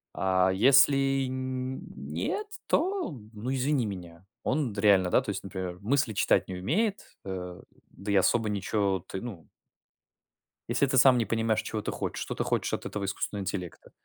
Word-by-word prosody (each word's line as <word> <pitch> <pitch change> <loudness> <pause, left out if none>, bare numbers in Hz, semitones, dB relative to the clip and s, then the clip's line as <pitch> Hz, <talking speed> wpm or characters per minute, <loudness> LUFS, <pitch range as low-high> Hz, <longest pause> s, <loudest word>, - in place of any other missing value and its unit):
А 95 0 +2
если 135 +4 +5
н 130 0 -3 0.2
нет, 80 - -3 0.2
то, 370 - 0 0.2
ну, 115 +5 -3
извини 135 -1 +1
меня. 90 -3 -8 0.2
Он 135 -5 0
д 100 - -3
реально, 100 -4 +5
да, - - +4
то - - -7
есть, 100 - -3
например, 95 -2 -5
мысли 120 +1 +1
читать - - +2
не 95 - -5
умеет, 190 - 0 0.2
э, 90 -2 -6 0.3
да 100 +1 -5
и - - +2
особо 110 +3 +3
ниче 100 -2 0
ты, 95 - -5
ну 100 - -8 1.2
Если 120 +4 +2
ты 130 - +1
сам 130 0 +7
не 115 - +1
понимаешь, 115 +1 +1
чего 110 - -3
ты - - -3
хочешь, - - -4
что - - -4
ты - - -1
хочешь - - -1
от - - -3
этого 105 -1 -3
искусственного 100 +1 -3
интеллекта. 90 -3 -5
105 Hz, 175 wpm, -28 LUFS, 95-130 Hz, 1.2 s, сам